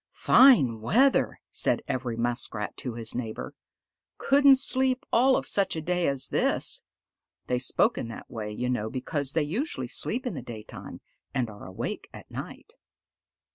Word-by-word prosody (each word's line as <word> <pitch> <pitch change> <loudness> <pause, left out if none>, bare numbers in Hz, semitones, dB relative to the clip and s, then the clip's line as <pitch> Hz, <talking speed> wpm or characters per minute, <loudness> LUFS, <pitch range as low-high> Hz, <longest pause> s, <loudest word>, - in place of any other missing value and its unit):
"Fine 140 - +5
weather!" 260 - +2
said - - 0
every 125 -3 -3
Muskrat 115 -3 -1
to 125 -3 -5
his 115 -1 -3
neighbor. 115 -3 -5 0.6
"Couldn't 280 0 +5
sleep 260 -1 +2
all 260 +3 +5
of - - -2
such 200 -4 +1
a 160 - -3
day 180 +2 0
as 140 -2 0
this." - - 0 0.6
They 125 - -1
spoke 125 - +2
in - - -4
that 115 - -9
way, 110 -3 -6
you 125 +4 -3
know, 110 -4 -1
because 135 +3 -1
they 160 - +1
usually 220 - -3
sleep 255 - -2
in 245 - -2
the 135 - -6
daytime 110 -3 -10 0.3
and 120 -4 -1
are 105 - -11
awake 95 - -6
at - - -13
night. - - -8
130 Hz, 160 wpm, -27 LUFS, -, 0.6 s, Fine